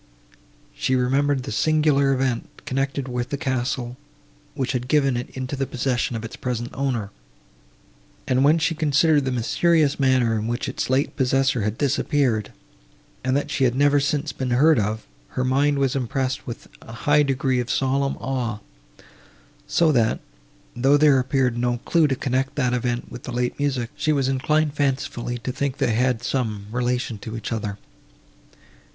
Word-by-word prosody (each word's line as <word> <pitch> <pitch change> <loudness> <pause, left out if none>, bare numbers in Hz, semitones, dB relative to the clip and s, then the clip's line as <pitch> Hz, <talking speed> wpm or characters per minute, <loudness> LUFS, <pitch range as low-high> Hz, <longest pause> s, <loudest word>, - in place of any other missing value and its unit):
She 130 - 0
remembered 135 +2 +1
the - - -6
singular 145 +3 +3
event, 130 -3 -2
connected 135 0 -2
with 125 -1 -3
the 140 - -2
castle, 125 -2 -2 0.6
which 130 -1 -1
had 125 -2 -2
given 140 -2 +2
it 120 +1 -4
into 130 +2 -3
the 135 -1 -2
possession 125 -1 -1
of 115 0 -4
its 115 - -8
present 120 -1 -3
owner; 125 -7 -2 1.2
and, 130 +1 +2
when 150 +3 +5
she 165 +1 +1
considered 155 -1 +3
the 130 - 0
mysterious 145 +5 +2
manner, 130 -4 +3
in 105 - -3
which 120 +1 -2
its - - -3
late 130 +2 +1
possessor 130 -2 +2
had 105 +2 -2
disappeared, 135 -5 +1 0.7
and 130 +1 +1
that 145 - -3
she 135 - 0
had 125 -1 +2
never 145 +1 +4
since 145 +2 -1
been 130 -1 -3
heard 140 +3 +4
of, 105 +1 -2 0.3
her 130 - +2
mind 140 +3 +2
was 135 -2 +1
impressed 135 +1 -2
with 120 - -7
a - - -12
high 145 0 +5
degree 135 -2 +1
of 120 -1 -3
solemn 135 +1 0
awe; 125 -5 -2 1.1
so 165 -2 +3
that, 115 -5 +2 0.6
though 135 +4 +4
there 145 -2 +5
appeared 130 -2 0
no 120 0 +1
clue 165 -3 +3
to 135 - 0
connect 130 0 -1
that 125 -4 +1
event 120 0 -2
with 120 - -8
the 130 - -7
late 125 +2 -2
music, 130 -4 -1
she 155 - 0
was 140 -3 +1
inclined 150 +3 +1
fancifully 135 -4 -1
to 120 +2 -4
think 140 +1 -2
they 115 - +1
had 125 0 +1
some 110 -7 -2
relation 125 -2 -1
to 110 +2 -6
each 115 - -6
other. 105 -3 -3
130 Hz, 170 wpm, -23 LUFS, 120-140 Hz, 1.2 s, when